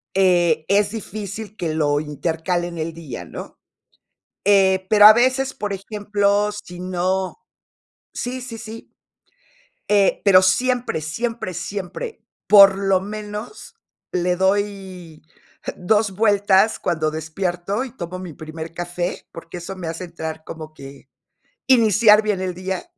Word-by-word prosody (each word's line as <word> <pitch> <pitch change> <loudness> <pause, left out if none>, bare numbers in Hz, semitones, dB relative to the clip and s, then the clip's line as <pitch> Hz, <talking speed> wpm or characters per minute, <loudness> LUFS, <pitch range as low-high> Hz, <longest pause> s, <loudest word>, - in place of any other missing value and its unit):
eh, 175 -5 +3
es 200 0 +2
difícil 215 -1 -7
que 160 -3 -2
lo 145 -2 +1
intercale 160 +4 -2
en 170 -1 -8
el 160 +1 -3
día, 135 - -8
¿no? - - -10 0.9
Eh, 190 -2 +4
pero 210 -1 +7
a 215 - +10
veces, 260 +3 +2
por 210 -5 -4
ejemplo, 205 +1 0
si 180 -4 -9
no 185 +1 -2 0.8
sí, 255 +1 -4
sí, 245 -2 -7
sí. 225 +1 -10 1.0
Eh, 200 -2 +3
pero 185 -2 +7
siempre, 245 0 +1
siempre, 190 +4 -3
siempre, 200 - -6 0.3
por 195 -2 +8
lo 195 -1 +2
menos, 210 - -7 0.4
le 180 0 0
doy 190 -3 -2 0.6
2 210 +3 +1
vueltas 205 0 +3
cuando 160 -3 -1
despierto, 175 - -3
y 260 -1 -12
tomo 180 -2 -6
mi 180 -4 -8
primer 160 +1 -8
café, 175 +1 -4
porque 165 +1 -9
eso 175 +3 -7
me 175 -3 -6
hace 165 +3 -5
entrar 160 -2 -7
como 155 -1 -9
que 140 -1 -13 0.6
iniciar 220 -3 +6
bien 210 -3 -1
el 185 -1 -2
día. 185 - -4
190 Hz, 135 wpm, -21 LUFS, 170-210 Hz, 1.0 s, a